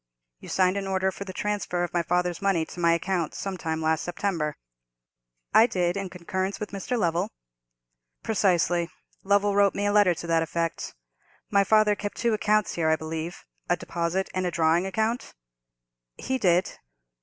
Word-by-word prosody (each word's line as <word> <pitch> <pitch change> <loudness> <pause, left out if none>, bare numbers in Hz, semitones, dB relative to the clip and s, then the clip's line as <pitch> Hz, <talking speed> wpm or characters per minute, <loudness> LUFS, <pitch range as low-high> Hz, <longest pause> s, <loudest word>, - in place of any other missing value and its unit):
You - - -11
signed 185 +1 +2
an 195 -1 -3
order 190 0 +1
for 200 - -7
the 190 - -6
transfer 195 -3 -2
of 175 - -4
my 175 - +2
father's 180 +1 0
money 195 -5 +2
to 175 - -10
my 170 -1 +4
account 170 -1 -1
some 195 -1 -4
time 160 -2 -3
in 160 - -4
last 160 0 +1
September." 170 -4 -2 1.0
"I 225 - +7
did, 180 -4 0
in 195 -1 -3
concurrence 185 +2 -3
with 210 - -5
Mr. 200 +5 -3
Lovell." 175 0 0 0.9
"Precisely; 175 -5 +2 0.3
Lovell 200 +1 +3
wrote 200 -1 +4
me 205 - -1
a 205 - +2
letter 205 -4 +5
to 170 - -7
that 165 -1 +2
effect. 165 0 -3 0.6
My 200 -1 +5
father 215 0 +4
kept 205 0 -5
two 235 -1 +1
accounts 215 0 +2
here, 160 -2 +1
I 160 - +4
believe—a 160 - -5
deposit 170 +3 -2
and 185 -1 0
a - - +1
drawing 170 +2 +2
account?" 220 +5 -2 0.8
"He 260 0 -2
did." 180 -4 +2
185 Hz, 175 wpm, -26 LUFS, 170-200 Hz, 1.0 s, I